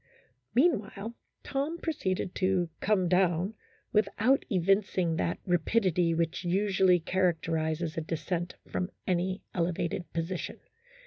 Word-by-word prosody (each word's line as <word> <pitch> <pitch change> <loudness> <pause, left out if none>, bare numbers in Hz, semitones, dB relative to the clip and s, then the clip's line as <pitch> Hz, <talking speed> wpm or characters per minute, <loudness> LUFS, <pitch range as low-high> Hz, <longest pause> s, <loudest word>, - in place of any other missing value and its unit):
Meanwhile, 230 - +1 0.3
Tom 285 +5 -2
proceeded 190 - -2
to 185 -2 +1
"come 195 -4 +2
down 180 +2 +2 0.2
" - - -36
without 215 +5 +3
evincing 185 -3 +2
that 170 - 0
rapidity 180 -1 +2
which 165 +2 -1
usually 185 0 +3
characterizes 165 -2 0
a - - +1
descent 170 +2 -3
from 180 - -2 0.2
any 185 +1 0
elevated 170 0 -1
position. 170 +2 -3
185 Hz, 110 wpm, -30 LUFS, 170-200 Hz, 0.3 s, without